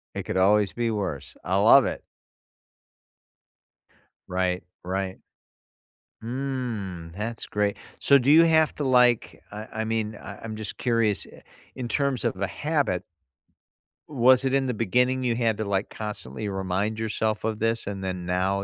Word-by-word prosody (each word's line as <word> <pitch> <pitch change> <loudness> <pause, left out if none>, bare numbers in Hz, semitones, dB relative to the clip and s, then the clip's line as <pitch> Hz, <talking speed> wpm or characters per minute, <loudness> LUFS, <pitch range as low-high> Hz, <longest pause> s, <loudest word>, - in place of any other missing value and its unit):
It - - -3
could 95 - -3
always 100 +1 +3
be 120 -1 -1
worse, 95 -10 -4
I 95 +2 0
love 115 +7 +7
it. - - -3 2.3
Right, 90 0 0 0.2
right. 95 0 -3 1.0
Mm, 115 -9 -4
that's 110 +2 -4
great. 105 -1 0 0.2
So 140 - +6
do 135 +2 +3
you 165 +2 +8
have 160 -1 +3
to, 150 - -3
like, 125 -3 +3
I 105 +2 -7
I 110 - -2
mean, 110 -1 -2
I 100 - -9
I'm 110 -1 -5
just 110 -2 -6
curious, 115 -4 +1
i - - -15 0.3
in 125 -2 -4
terms 140 -1 0
of - - 0
a 100 - +1
habit 145 - -1 1.1
was 130 -1 +4
it 135 0 +1
in 135 -1 +2
the 125 - -1
beginning 125 +4 +1
you 120 -2 +1
had 115 -3 +1
to, 110 - -1
like, 100 0 -1
constantly 105 -3 -5
remind 95 +3 -2
yourself 110 -1 -1
of 110 -1 -2
this, 115 +1 0
and 100 -1 -5
then 90 -1 -4
now, 95 +2 0
110 Hz, 160 wpm, -25 LUFS, 95-125 Hz, 2.3 s, you